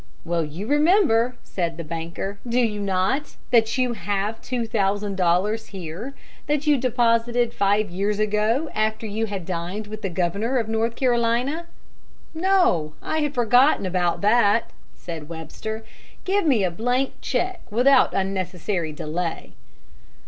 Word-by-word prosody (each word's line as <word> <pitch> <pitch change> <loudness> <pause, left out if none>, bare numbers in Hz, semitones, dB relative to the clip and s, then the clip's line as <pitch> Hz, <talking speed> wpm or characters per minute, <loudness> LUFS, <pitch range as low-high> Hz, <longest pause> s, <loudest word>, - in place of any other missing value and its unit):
"Well, 170 -1 0
you 155 +7 -6
remember," 290 - +3
said 170 -3 -3
the 170 - -5
banker, 170 +5 -5
"do 240 +2 +2
you 220 -4 +1
not, 195 +9 0 0.2
that 230 0 +3
you 250 -2 +1
have 205 +2 -2
two 245 -2 -2
thousand 205 -2 0
dollars 190 +5 +1
here, 190 - -7 0.3
that 295 0 0
you 300 -1 +5
deposited 240 -1 +1
five 205 -1 +1
years 200 +3 -1
ago, 215 +8 +1
after 215 +1 -1
you 220 +1 -2
had 195 -4 -5
dined 180 +4 -4
with 215 +1 -8
the 195 - -2
Governor 195 +9 0
of 230 -3 0
North 225 +1 0
Carolina?" 250 +6 +1 0.7
"No, 325 - +2
I 315 - -1
had 295 -1 -1
forgotten 245 0 +4
about 180 -2 0
that," 210 +1 +3 0.2
said 165 -3 -8
Webster. 170 +7 -6 0.4
"Give 390 -2 +1
me 240 -9 +3
a 180 - +1
blank 245 +8 0
check 370 +1 -1
without 255 +5 +4
unnecessary 185 -3 -2
delay." 160 +3 -4
215 Hz, 140 wpm, -23 LUFS, 185-245 Hz, 0.7 s, you